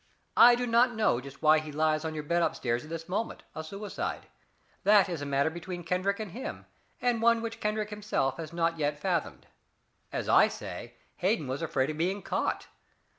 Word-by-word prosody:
I 240 0 +9
do 245 +1 -1
not 240 +1 +3
know 215 - +2
just 140 +3 -12
why 155 0 +6
he 155 -1 -7
lies 155 +1 +1
on 160 -1 -3
your 150 - -4
bed 170 +3 +1
up - - +1
stairs 120 -1 -1
at 155 - -12
this 165 0 -6
moment, 205 +5 -3
a 160 - -5
suicide 200 +6 -5 0.6
that 205 -1 +6
is 170 -5 -4
a 145 - -4
matter 140 +2 +1
between 175 +1 -6
Kendrick 185 +4 0
and 215 -4 -5
him, 255 +8 -6 0.3
and 240 -2 +1
one 230 0 +5
which 230 0 -5
Kendrick 210 0 -1
himself 205 -11 -1
has 160 -2 -6
not 165 -1 0
yet 145 0 0
fathomed. 175 -1 -2 0.7
As - - -3
I - - +6
say, - - -7 0.2
Hayden 190 -3 +1
was 130 +4 -3
afraid 150 -3 0
of 155 - -8
being 190 +4 0
caught. - - -1
170 Hz, 200 wpm, -29 LUFS, 155-210 Hz, 0.7 s, I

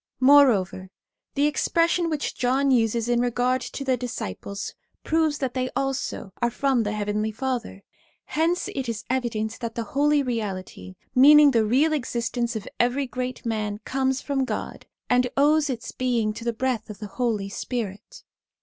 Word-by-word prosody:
Moreover, 250 -9 +4 0.5
the 285 +1 +3
expression 335 +3 +1
which 305 -2 -2
John 265 +2 +1
uses 230 -2 +2
in 240 0 +2
regard 245 +1 +1
to 275 - -6
the 260 -1 +2
disciples, 200 - -5 0.3
proves 315 -2 +1
that 265 -4 -2
they 255 -1 -1
also 270 -7 -3
are 235 - +3
from 270 0 +1
the 210 -1 -2
Heavenly 210 +1 -1
Father. 235 -4 -4 0.4
Hence 330 +3 0
it 265 -3 -4
is 220 -3 -4
evident 225 -4 -2
that 230 -2 -5
the 235 - -2
holy 290 +5 +2
reality, 190 - -4 0.2
meaning 290 +3 +8
the 225 -3 +3
real 275 +8 +3
existence 235 -3 -2
of 215 - -5
every 250 +3 +2
great 250 0 -5
man, 215 -2 -2
comes 265 0 0
from 275 -2 -1
God, 260 - -5 0.2
and 250 0 +3
owes 300 +1 +4
its 250 -1 -4
being 235 -4 0
to 230 - -8
the 235 - +1
breath 235 -1 -2
of 210 - -7
the 210 - -7
Holy 205 -1 -2
Spirit. 205 -2 -5
245 Hz, 160 wpm, -25 LUFS, 220-270 Hz, 0.5 s, meaning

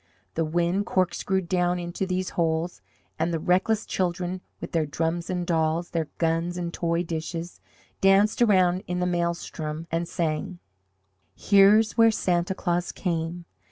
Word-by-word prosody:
The 165 - 0
wind 175 +5 0
corkscrewed 185 0 0
down 180 0 +1
into 175 +2 -3
these 185 0 -2
holes, 165 - -1 0.4
and 170 - +1
the 165 - 0
reckless 190 +7 +1
children 180 0 -2 0.2
with - - -7
their 160 -3 0
drums 165 +3 -2
and 180 -1 -1
dolls, 165 0 0
their 165 -3 -1
guns 165 +1 0
and 170 -1 -4
toy 170 0 0
dishes, 165 +1 -5 0.4
danced 195 +4 +4
around 185 -4 +4
in 180 0 -2
the 180 - +1
maelstrom 170 -3 -2
and 165 +1 -1
sang: 165 0 -2 0.8
"Here's 210 +3 +4
where 225 0 +8
Santa 180 -3 0
Claus 175 -2 -1
came! 170 -1 -3
175 Hz, 145 wpm, -26 LUFS, 165-185 Hz, 0.8 s, where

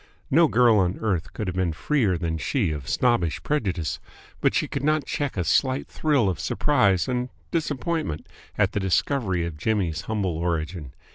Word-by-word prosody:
No 165 +4 +6
girl 120 -5 +4
on 90 0 +1
earth 95 -6 -1
could 105 - -4
have 90 -2 -3
been 90 -3 0
freer 105 - +1
than 80 -1 -2
she 105 - 0
of 70 -5 -5
snobbish 105 - +1
prejudice, 95 - -1 0.4
but - - +2
she - - +1
could - - -4
not 155 0 +2
check 145 -7 -3
a 90 - +1
slight 130 - +1
thrill 145 -9 +1
of 90 -6 -1
surprise 100 - +2
and 125 0 -1 0.2
disappointment 155 - -2 0.3
at - - +3
the - - -1
discovery 95 -1 0
of 85 -3 -6
Jimmy's 85 -4 0
humble 95 -7 -1
origin. 80 -4 -3
95 Hz, 170 wpm, -25 LUFS, 85-130 Hz, 0.4 s, No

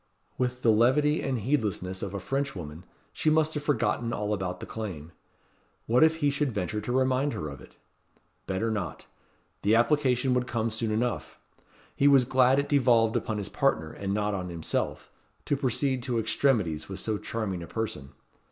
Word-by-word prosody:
With 125 0 -2
the 115 - +5
levity 135 +8 +3
and 135 -2 -1
heedlessness 105 -7 -1
of 100 0 -4
a - - -2
Frenchwoman, 90 - -4 0.3
she 155 - +1
must 155 0 +3
have 150 - -2
forgotten 120 -4 0
all 105 0 -1
about 95 -3 -3
the - - -6
claim. 90 -8 -6 0.7
What 120 +5 +4
if 160 0 +5
he 145 -3 +1
should 145 -1 0
venture 105 0 -2
to 115 - -4
remind 130 +2 +1
her 100 -9 -4
of 70 -2 -10
it? - - -16 0.7
Better 110 +4 -1
not. 95 -8 -4 0.6
The 105 +3 +3
application 130 0 +2
would 125 0 0
come 115 -2 -1
soon 110 +1 -2
enough. 115 +3 -2 0.6
He 140 - +3
was 135 -3 +6
glad 130 +1 +4
it 140 0 +1
devolved 120 -5 +3
upon 110 - -1
his 100 -3 -3
partner, 80 0 0
and 100 -1 -4
not 105 +1 0
on 90 -2 -3
himself, 85 -2 -3 0.3
to 145 - +1
proceed 130 -1 0
to 120 -1 -2
extremities 110 - +1
with 95 -1 -5
so 105 +1 -2
charming 100 -6 -3
a 85 - -7
person. 110 -12 -4
115 Hz, 180 wpm, -28 LUFS, 100-130 Hz, 0.7 s, was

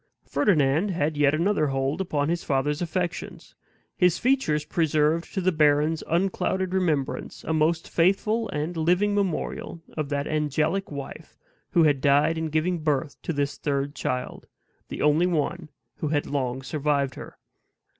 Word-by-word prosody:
Ferdinand 150 +3 +2
had 160 -4 -1
yet 145 0 +3
another 170 -1 +1
hold 135 +5 -1
upon 145 -6 -1
his 170 +1 -1
father's 145 +3 0
affections: 175 +1 -4 0.4
his 180 -2 +3
features 240 - +1
preserved 155 0 +1
to 190 - 0
the 185 +1 +2
baron's 155 0 +2
unclouded 185 +1 0
remembrance 160 -8 -1
a 160 - -2
most 160 +2 +1
faithful 210 +6 +1
and 150 +4 -3
living 180 +6 +2
memorial 190 -3 -2 0.2
of 150 -3 -3
that 140 -1 -1
angelic 155 +6 0
wife 140 -2 -8 0.4
who 170 -4 +5
had 145 -4 +3
died 145 +4 +3
in 160 0 -2
giving 160 +3 0
birth 150 -2 -1
to - - -3
this 145 -2 -2
third 140 -1 -1
child 125 -3 -4 0.4
the - - -4
only 150 +4 +4
one 170 0 -1 0.3
who 155 - -2
had 145 -1 0
long 130 -2 -2
survived 140 -1 0
her. - - -10
155 Hz, 150 wpm, -25 LUFS, 145-175 Hz, 0.4 s, who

